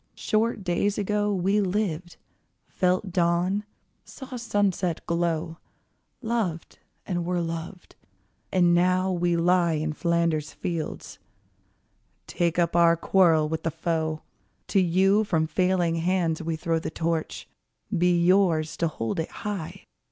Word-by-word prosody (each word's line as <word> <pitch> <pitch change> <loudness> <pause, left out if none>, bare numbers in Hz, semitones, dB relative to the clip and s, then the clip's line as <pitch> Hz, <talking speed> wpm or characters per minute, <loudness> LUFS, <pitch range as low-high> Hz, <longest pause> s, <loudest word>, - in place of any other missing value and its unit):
Short 215 -1 0
days 190 +3 0
ago 210 +1 0
We 195 +2 +1
lived, 185 -3 -2 0.5
felt 185 +1 0
dawn, 180 +3 +1 0.4
saw 265 -2 -10
sunset 200 -7 -1
glow, 170 -1 -1 0.6
Loved, 220 -8 -3 0.3
and 175 -3 -2
were 175 +1 -1
loved, 165 +2 -6 0.6
and 175 -2 +4
now 185 +2 +2
we 175 -1 +1
lie 170 0 +3
In 155 0 -2
Flanders 170 -2 0
fields. 165 -3 -5 1.1
Take 170 -1 -1
up 170 -1 +1
our 170 -1 +5
quarrel 165 -3 +3
with 160 +1 -3
the 165 - -1
foe: 160 -1 -2 0.5
To 200 - +3
you 190 +4 +3
from 160 -6 0
failing 175 0 +1
hands 170 -1 0
we 165 0 -2
throw 165 +1 -1
The - - -4
Torch: 165 0 -3 0.5
be 175 0 +3
yours 175 -4 +3
to 170 - +1
hold 115 -4 -3
it 160 - -2
high! 195 -3 -6
175 Hz, 130 wpm, -26 LUFS, 165-190 Hz, 1.1 s, our